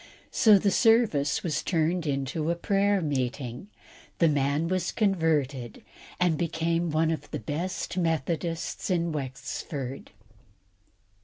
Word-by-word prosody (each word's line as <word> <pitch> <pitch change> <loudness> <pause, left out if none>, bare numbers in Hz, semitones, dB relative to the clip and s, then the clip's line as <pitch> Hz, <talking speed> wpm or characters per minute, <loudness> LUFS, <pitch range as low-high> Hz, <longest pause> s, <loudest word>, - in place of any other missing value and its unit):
So 220 -6 +6
the 200 +1 +1
service 225 - +3
was 155 -5 -1
turned 165 -1 0
into 140 +3 -1
a 170 - +1
prayer 200 +2 +1
meeting, 130 - -3 0.5
the 170 - +4
man 145 +2 +1
was 185 0 -1
converted, 155 - 0 0.4
and 175 -4 +2
became 165 0 0
one 160 +1 +2
of 160 - -4
the - - -3
best 170 - -4
Methodists 165 +2 -2
in 170 -2 +1
Wexford. 135 -1 -5
160 Hz, 115 wpm, -27 LUFS, 140-180 Hz, 0.5 s, So